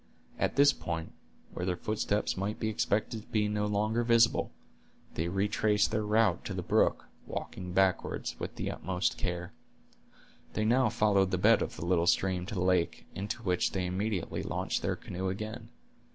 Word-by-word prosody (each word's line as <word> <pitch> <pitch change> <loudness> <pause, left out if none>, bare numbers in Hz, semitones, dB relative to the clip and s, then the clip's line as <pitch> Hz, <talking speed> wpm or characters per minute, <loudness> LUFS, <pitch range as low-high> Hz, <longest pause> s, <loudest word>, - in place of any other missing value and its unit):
At - - 0
this 140 0 +6
point, 85 -7 -4 0.4
where - - -4
their 90 -1 -1
footsteps 105 0 -1
might 100 +3 -3
be 110 - 0
expected 110 +1 0
to - - -20
be 105 -1 +1
no 105 0 0
longer 105 +3 +1
visible, 115 0 +4 0.6
they 80 - -2
retraced 105 +3 +1
their 110 -1 +1
route 105 -3 +2
to - - -4
the - - -3
brook, - - +2 0.2
walking 90 -1 -5
backward, 95 -1 +1
with - - -5
the - - -3
utmost 90 0 -2
care. 90 -1 -3 1.0
They 110 - 0
now 125 +3 +4
followed 100 -3 +3
the 95 - 0
bed 90 - +5
of - - -3
the 80 - -5
little 85 -1 +2
stream 90 -1 +2
to 105 - -5
the 90 - 0
lake, 90 -2 +1
into 105 +5 -4
which 90 -3 +1
they 95 -1 -1
immediately 95 +1 -2
launched - - -2
their - - 0
canoe 95 +1 -4
again. 110 +3 -5
100 Hz, 175 wpm, -30 LUFS, 90-110 Hz, 1.0 s, this